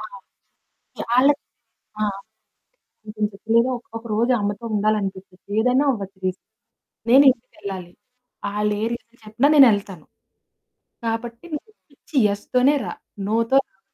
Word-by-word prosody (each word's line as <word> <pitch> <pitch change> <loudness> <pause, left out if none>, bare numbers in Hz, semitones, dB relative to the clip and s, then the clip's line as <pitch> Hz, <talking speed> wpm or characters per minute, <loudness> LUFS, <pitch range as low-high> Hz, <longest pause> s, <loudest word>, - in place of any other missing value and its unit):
ఆ! - - -6 1.0
చాలాక్ 265 +5 +3 1.6
ఇంకేం 210 0 -2
చెప్పలేదా 230 +5 +2
ఒక్ 235 - -19
ఒకరోజు 230 +2 0
అమ్మెతో 205 +3 -3
ఉండాలనిపిచ్చిద్ది. 200 -3 -2
ఏదన్నా 250 +5 +3
అవ్వచ్చు 195 -5 -6
రీజన్. 185 0 -3 0.6
నేను 270 +3 +8
ఇంటికెళ్ళాలి. 195 -7 -8 0.6
ఆళ్ళే 210 0 0
రీజన్ 230 0 -10
చెప్పినా 220 +6 +2
నేనేళ్తాను. 205 - +4 1.0
కాబట్టి 230 +3 -4
నువ్వొపిచ్చి 300 -4 -11
యెస్ 200 0 -4
తోనే 260 +4 +5
రా. 175 - -4 0.4
నోతో 230 +4 +2
రావద్దు. 265 -7 -4
225 Hz, 105 wpm, -22 LUFS, 205-250 Hz, 1.6 s, నేను